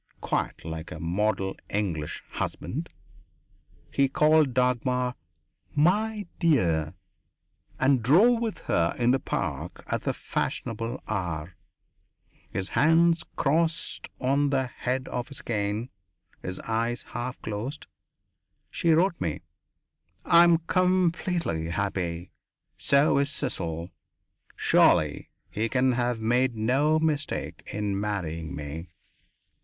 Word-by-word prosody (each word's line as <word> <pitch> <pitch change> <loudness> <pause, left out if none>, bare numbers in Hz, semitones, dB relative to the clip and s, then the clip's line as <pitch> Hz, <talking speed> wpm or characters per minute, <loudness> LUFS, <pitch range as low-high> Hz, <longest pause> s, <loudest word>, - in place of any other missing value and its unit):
Quite - - -2
like 80 0 -6
a - - -6
model 95 +3 0
English 90 -8 -2
husband, - - -4 1.0
he 140 -1 +3
called 155 0 +4
Dagmar 125 0 +1 0.6
"My 205 +7 +2
dear" 90 - +2 0.8
and 130 -1 +3
drove 210 - +5
with 225 -3 -2
her 85 0 +1
in 120 0 +3
the 135 - +3
Park - - -4
at - - -2
the - - 0
fashionable 115 +2 -3
hour, 85 -4 -3 0.9
his 95 0 -3
hands 165 +2 +4
crossed 165 +3 0
on 140 +2 +2
the 135 -2 +1
head 130 +1 -3
of 125 -1 -3
his 140 - -8
cane, 105 +1 -2 0.5
his 90 0 -5
eyes 115 +1 -1
half 120 +2 -4
closed. 110 +8 -4 0.9
She 165 -1 +2
wrote 170 +2 +2
me: 80 -4 -2 0.8
"I 170 0 +7
am 170 -1 +6
completely 180 - +1
happy. 90 -2 -2 0.4
So 140 +1 +3
is 140 0 +1
Cecil. 85 - -3 0.6
Surely - - +3 0.2
he 110 +2 -1
can 130 +1 +3
have 120 -1 0
made 120 +2 +2
no 135 +8 +2
mistake 155 -2 -1
in 100 -1 -1
marrying 85 -7 -3
me." 75 +4 -6
125 Hz, 110 wpm, -27 LUFS, 95-150 Hz, 1.0 s, I